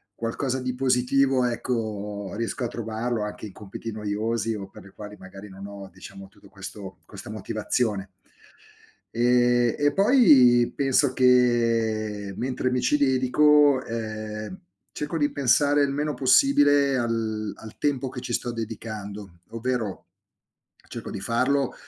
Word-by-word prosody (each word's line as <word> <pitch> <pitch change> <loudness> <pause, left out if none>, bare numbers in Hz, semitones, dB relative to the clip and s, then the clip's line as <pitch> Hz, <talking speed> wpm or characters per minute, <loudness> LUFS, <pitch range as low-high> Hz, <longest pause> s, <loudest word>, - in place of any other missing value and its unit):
qualcosa 130 +3 -2
di 125 0 -3
positivo 130 0 +2
ecco 105 -5 -3
riesco 115 +2 -3
a - - 0
trovarlo 115 0 -3
anche 105 +1 -6
in 100 - -10
compiti 105 +2 -8
noiosi 110 +2 -2
o 100 -2 -7
per - - -14
le 100 - -15
quali 105 0 -10
magari 95 +2 -11
non 95 +1 -10
ho 100 -1 -10
diciamo 95 +1 -11
tutto 100 0 -20
questo 95 0 -9
questa - - -11
motivazione. 105 -1 -2 1.1
Ehm, 120 0 +3
e 145 0 +2
poi 140 - +5
penso 135 -1 +2
che 115 -5 +2
mentre 130 0 -2
mi 125 -1 0
ci 150 - +2
dedico, 140 +1 +4
ehm, 110 - -6 0.3
cerco 150 +2 -4
di 145 -1 +1
pensare 145 +2 +3
il 140 - 0
meno 150 +1 -2
possibile 145 - +4
al 110 -3 -2
al 110 -1 -12
tempo 135 -3 -1
che 130 - -7
ci 120 - -5
sto 120 - -1
dedicando, 105 -4 -7
ovvero 115 -3 -3 0.8
cerco - - -7
di 95 - -6
farlo 130 +5 0
120 Hz, 135 wpm, -25 LUFS, 105-130 Hz, 1.1 s, poi